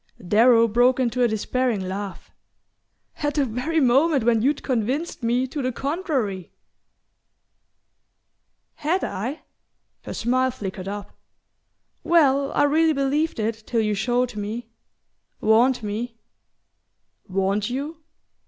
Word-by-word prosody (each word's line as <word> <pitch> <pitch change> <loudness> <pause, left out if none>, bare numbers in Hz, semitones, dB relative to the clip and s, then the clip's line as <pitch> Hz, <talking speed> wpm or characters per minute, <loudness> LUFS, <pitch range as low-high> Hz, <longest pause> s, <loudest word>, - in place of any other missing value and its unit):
Darrow 230 +3 +5
broke 245 +4 +3
into 250 -1 0
a 240 - +5
despairing 230 0 -1
laugh. 195 +1 -6 0.9
"At 290 -1 -2
the 290 -3 +2
very 255 +8 -1
moment 275 +1 +3
when 230 -1 +3
you'd 285 +4 +1
convinced 260 +7 -2
me 240 +2 +1
to 280 +3 -5
the 255 0 -1
contrary!" 270 - -2 2.3
"Had 340 +5 0
I?" 245 +11 -4 0.6
Her - - -6
smile 255 +3 +1
flickered 195 -6 -6
up. 205 0 -6 0.9
"Well, 280 -5 +3
I - - +3
really 315 +2 +3
believed 285 +1 0
it 220 +1 -2
till 230 -2 +1
you 215 -1 0
showed 245 +3 0
me... 220 +3 -5 0.7
warned 235 +3 +3
me..." 225 +3 -4 1.1
"Warned 195 +2 0
you?" 285 +6 -4
245 Hz, 115 wpm, -23 LUFS, 220-275 Hz, 2.3 s, Darrow